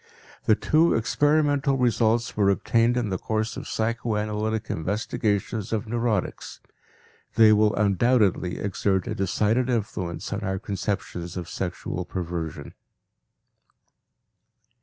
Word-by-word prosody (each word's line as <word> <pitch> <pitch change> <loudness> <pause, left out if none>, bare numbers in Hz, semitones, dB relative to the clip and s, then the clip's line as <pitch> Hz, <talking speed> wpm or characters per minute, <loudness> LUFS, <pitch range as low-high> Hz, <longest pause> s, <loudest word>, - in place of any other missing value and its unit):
The - - +5
two 160 +2 +3
experimental 145 +3 +2
results 120 -2 +1
were 100 -2 +3
obtained 115 +4 +2
in 120 -4 0
the 95 - -2
course 110 +1 -2
of - - -7
psychoanalytic 110 -1 -1
investigations 105 - -2
of 110 +1 -1
neurotics; 115 -3 -2 0.8
they 110 -1 +7
will 105 0 +3
undoubtedly 100 -2 +2
exert 95 -2 0
a - - -3
decided 105 +6 +1
influence 100 -8 -3
on 100 - -2
our 95 -2 -2
conceptions 95 -3 -4
of 90 -2 -5
sexual 90 -1 -4
perversion. 85 -3 -5
105 Hz, 110 wpm, -25 LUFS, 95-115 Hz, 0.8 s, they